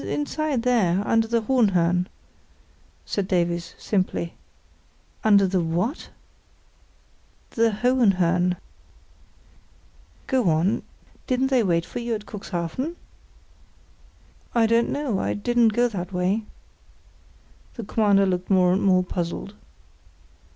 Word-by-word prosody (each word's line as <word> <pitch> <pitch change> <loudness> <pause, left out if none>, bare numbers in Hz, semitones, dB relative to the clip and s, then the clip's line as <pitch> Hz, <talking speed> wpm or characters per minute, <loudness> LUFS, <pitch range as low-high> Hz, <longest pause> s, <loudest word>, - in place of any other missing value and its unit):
"Inside 295 -3 -2
there, 205 -7 +2
under 225 0 +2
the 230 0 0
Hohenhörn," 185 -8 +2 1.0
said 200 -2 -2
Davies, 170 -2 -1
simply. 185 -4 -2 0.9
"Under 205 -2 +5
the 185 -1 +1
what?" 175 - -2 1.4
"The 230 0 +2
Hohenhörn." 190 -7 +2 1.7
"Go 255 -9 +1
on—didn't 220 - -2
they 255 -2 +4
wait 170 -5 +1
for - - -6
you 235 -1 -2
at 210 -1 -7
Cuxhaven?" 205 - -4 1.6
"I 230 -1 +4
don't 230 +1 +2
know; 275 -9 -1
I - - -1
didn't 240 +2 +2
go 240 +3 +2
that 180 -5 -5
way." 190 +4 0 1.3
The 235 - -6
Commander 200 -2 +3
looked 180 -1 -2
more 180 -2 +4
and 190 - +1
more 185 -2 +3
puzzled. 180 +2 -4
200 Hz, 105 wpm, -24 LUFS, 180-235 Hz, 1.7 s, Under